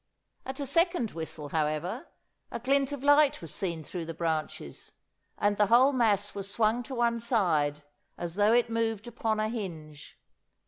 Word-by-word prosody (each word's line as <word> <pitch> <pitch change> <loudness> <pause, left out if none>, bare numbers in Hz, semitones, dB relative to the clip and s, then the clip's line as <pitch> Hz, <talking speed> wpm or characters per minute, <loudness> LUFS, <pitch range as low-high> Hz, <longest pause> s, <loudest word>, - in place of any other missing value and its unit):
At 265 +1 -5
a 285 - -2
second 330 - +1
whistle, 160 -2 -6
however, 160 - -2 0.4
a - - -5
glint 275 +3 +1
of 285 -2 -5
light 290 0 +5
was 160 -3 -8
seen 170 -3 -3
through 165 +4 -6
the 165 - -5
branches, 155 - -4 0.4
and 205 0 +1
the 210 - +4
whole 255 +6 +5
mass 210 -5 +2
was 200 -1 -5
swung 220 +2 +2
to 260 +2 -7
one 235 -1 +1
side 165 - +1 0.3
as 170 -1 -4
though 205 +3 +3
it 240 0 +4
moved 225 -1 -1
upon 225 -2 -2
a 215 - +1
hinge. 165 -10 -7
215 Hz, 170 wpm, -29 LUFS, 165-245 Hz, 0.4 s, light